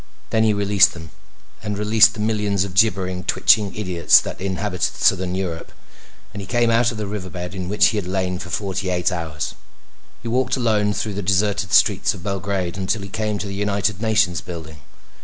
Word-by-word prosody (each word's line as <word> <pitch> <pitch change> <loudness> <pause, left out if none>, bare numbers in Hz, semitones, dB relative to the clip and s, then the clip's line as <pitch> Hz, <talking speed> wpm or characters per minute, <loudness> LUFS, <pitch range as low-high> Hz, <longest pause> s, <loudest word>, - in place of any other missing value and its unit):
Then 110 -1 +2
he 110 - +3
released 100 -1 +3
them, 80 -2 -10 0.5
and 105 -1 -4
released 110 +2 +4
the - - -9
millions 105 -3 0
of 100 -2 -6
gibbering, 95 -3 +1
twitching 105 +2 +3
idiots 90 -5 +4
that - - -7
inhabited 95 -1 -2
Southern 90 0 +2
Europe, 90 -4 -4 0.6
and 100 - -6
he 95 - -9
came 120 0 +2
out 115 +1 +3
of 115 - -7
the 105 - -3
river 100 -2 -5
bed 90 0 -6
in 95 -2 -5
which 105 +1 +4
he 110 - -3
had 100 -4 -3
lain 90 -1 -2
for 90 - -8
forty 95 +1 -3
eight 90 +1 0
hours. 80 -4 -4 0.7
He - - -5
walked 130 +3 0
alone 105 -4 +1
through 105 - -3
the 100 - -4
deserted 100 +1 0
streets - - +3
of 90 - -11
Belgrade 95 -2 -3
until 100 +2 -2
he 100 - -8
came 105 +1 -2
to 105 - -5
the 100 - -6
United 100 -1 -1
Nations 110 -6 +1
building. 80 -3 -9
100 Hz, 195 wpm, -21 LUFS, 90-105 Hz, 0.7 s, released